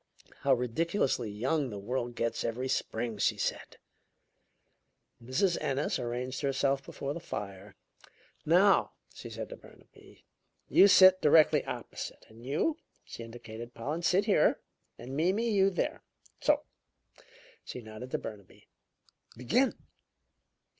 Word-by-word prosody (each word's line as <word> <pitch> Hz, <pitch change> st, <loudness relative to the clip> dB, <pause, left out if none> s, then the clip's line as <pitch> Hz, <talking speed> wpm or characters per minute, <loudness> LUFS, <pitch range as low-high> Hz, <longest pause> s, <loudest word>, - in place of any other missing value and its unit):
"How 135 Hz, -1 st, +3 dB
ridiculously 125 Hz, -, 0 dB
young 130 Hz, +7 st, -1 dB
the 105 Hz, -, -6 dB
world 120 Hz, +3 st, -3 dB
gets 115 Hz, -1 st, -1 dB
every 125 Hz, +3 st, -2 dB
spring!" 115 Hz, -3 st, -2 dB
she -, -, +2 dB
said. -, -, -3 dB, 1.5 s
Mrs. 150 Hz, +9 st, +1 dB
Ennis 135 Hz, +1 st, -1 dB
arranged 125 Hz, +2 st, -3 dB
herself 135 Hz, -1 st, +1 dB
before 140 Hz, +1 st, -5 dB
the 170 Hz, -, -6 dB
fire. 100 Hz, -, -7 dB, 0.7 s
"Now," 185 Hz, +5 st, +4 dB, 0.2 s
she -, -, -9 dB
said -, -, -6 dB
to -, -, -7 dB
Burnaby, -, -, -19 dB, 0.4 s
"you 200 Hz, -, +7 dB
sit 185 Hz, -1 st, +7 dB
directly 150 Hz, -1 st, +5 dB
opposite. 120 Hz, -2 st, -7 dB
And 115 Hz, +1 st, -15 dB
you" 160 Hz, -, 0 dB, 0.3 s
she -, -, -9 dB
indicated 115 Hz, 0 st, -9 dB
Pollen 150 Hz, +8 st, -3 dB
"sit 180 Hz, +4 st, +2 dB
here. 200 Hz, -8 st, +3 dB, 0.4 s
And 130 Hz, +3 st, -8 dB
Mimi, 190 Hz, +9 st, +1 dB
you 195 Hz, -2 st, +4 dB
there. 185 Hz, -, -2 dB, 0.4 s
So!" -, -, +2 dB, 1.0 s
She -, -, -7 dB
nodded 110 Hz, +3 st, -9 dB
to -, -, -1 dB
Burnaby. 105 Hz, -4 st, -10 dB, 0.7 s
"Begin!" 245 Hz, -, +1 dB
130 Hz, 125 wpm, -30 LUFS, 115-170 Hz, 1.5 s, you